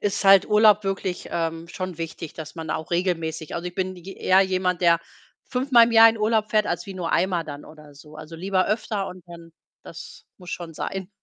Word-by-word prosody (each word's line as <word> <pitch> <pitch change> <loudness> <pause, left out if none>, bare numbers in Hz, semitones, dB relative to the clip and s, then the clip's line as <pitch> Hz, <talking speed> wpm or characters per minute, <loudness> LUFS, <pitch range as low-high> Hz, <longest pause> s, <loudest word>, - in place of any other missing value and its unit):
ist 205 -1 -2
halt 195 0 +7
Urlaub 210 -1 +5
wirklich, 195 -2 -3
ähm, 165 0 -3
schon 185 -1 -6
wichtig, 165 -1 -6
dass 160 0 -9
man 160 -2 -6
auch 160 - -4
regelmäßig 165 -3 -2
also, 170 +1 -5
ich 180 - -7
bin 185 0 -3
j 190 +2 -11
eher 190 +1 +4
jemand, 185 -2 -1
der 170 -1 +4 0.5
fünfmal 250 -2 +4
im 235 - -3
Jahr 225 0 +9
in 225 0 -1
Urlaub 215 0 +1
fährt, 215 -1 +2
als 175 +1 -3
wie 195 - -8
nur 175 -3 -4
einmal 180 -1 +1
dann 145 -1 -9
oder 150 -1 -15
so. 150 +2 -15
Also, 155 +2 -10
lieber 185 +1 0
öfter 210 -2 -2
und 180 -1 -11
dann 170 -1 -12 0.3
das - - -12
muss 180 -2 -11
schon 170 -2 -6
sein. 190 +3 -5
180 Hz, 215 wpm, -23 LUFS, 165-195 Hz, 0.5 s, Jahr